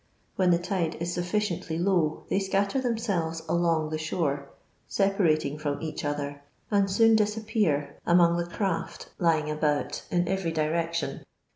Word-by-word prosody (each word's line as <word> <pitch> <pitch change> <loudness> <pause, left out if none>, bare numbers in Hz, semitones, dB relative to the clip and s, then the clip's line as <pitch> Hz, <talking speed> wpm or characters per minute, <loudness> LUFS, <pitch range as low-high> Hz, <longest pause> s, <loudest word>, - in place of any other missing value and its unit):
When 185 -2 +3
the 175 - +5
tide 175 -2 -1
is 170 +1 -2
sufii 180 +1 -1
ciently 160 0 -4
low 175 -4 +1
they - - +1
scatter 200 +6 0
themselves 200 -10 -1
along 165 -2 +1
the 155 - -2
shore, 145 -3 -2 0.4
separating 160 -7 +1
from 145 -1 -2
each 160 -1 -5
other, 145 -1 -3 0.3
ai^d 200 -1 +3
soon 225 +3 +5
dis 210 0 +2
appear 210 -10 0
among 170 -1 +4
the 175 0 -2
craft 190 -1 -3
lying 160 -3 +2
about 150 -1 0
in 175 -1 +1
every 190 -2 -1
direc 165 +2 0
tion. 170 - -2
170 Hz, 155 wpm, -27 LUFS, 155-195 Hz, 0.4 s, the